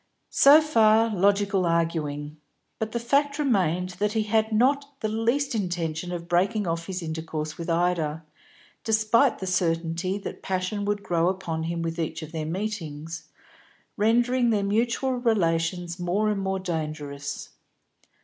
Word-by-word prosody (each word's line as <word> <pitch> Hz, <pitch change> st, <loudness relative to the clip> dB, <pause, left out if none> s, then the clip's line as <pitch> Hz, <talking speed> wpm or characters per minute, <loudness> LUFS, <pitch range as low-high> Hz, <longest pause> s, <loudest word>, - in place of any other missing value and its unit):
So 290 Hz, +3 st, +7 dB
far 225 Hz, -6 st, +4 dB
logical 200 Hz, 0 st, +2 dB
arguing. 160 Hz, -3 st, -1 dB, 0.4 s
But 220 Hz, 0 st, -2 dB
the 235 Hz, -, -2 dB
fact 280 Hz, +4 st, +1 dB
remained 185 Hz, -, +1 dB
that 210 Hz, +1 st, +1 dB
he 220 Hz, -1 st, +1 dB
had 220 Hz, +1 st, +1 dB
not 275 Hz, +5 st, +1 dB
the 220 Hz, -, 0 dB
least 235 Hz, +6 st, 0 dB
intention 175 Hz, -4 st, -2 dB
of 170 Hz, -1 st, -5 dB
breaking 195 Hz, +5 st, +1 dB
off 165 Hz, -1 st, -2 dB
his 185 Hz, -2 st, -4 dB
intercourse 160 Hz, -1 st, -4 dB
with 170 Hz, -, -5 dB
Ida, 165 Hz, -2 st, 0 dB, 0.6 s
despite 225 Hz, +4 st, +3 dB
the 190 Hz, -, -5 dB
certainty 170 Hz, +1 st, 0 dB
that 200 Hz, -, -7 dB
passion 190 Hz, +2 st, -2 dB
would 205 Hz, 0 st, -1 dB
grow 170 Hz, 0 st, +1 dB
upon 165 Hz, -4 st, -3 dB
him 170 Hz, 0 st, -2 dB
with 165 Hz, 0 st, -3 dB
each 160 Hz, 0 st, -3 dB
of 155 Hz, -, -9 dB
their 160 Hz, -2 st, -4 dB
meetings, 165 Hz, -4 st, -5 dB, 0.7 s
rendering 240 Hz, +3 st, +2 dB
their 210 Hz, -3 st, +1 dB
mutual 235 Hz, +6 st, +1 dB
relations 175 Hz, -6 st, 0 dB
more 190 Hz, +5 st, +1 dB
and 200 Hz, -2 st, -2 dB
more 190 Hz, 0 st, -1 dB
dangerous. 150 Hz, -5 st, -4 dB
185 Hz, 145 wpm, -26 LUFS, 165-220 Hz, 0.7 s, So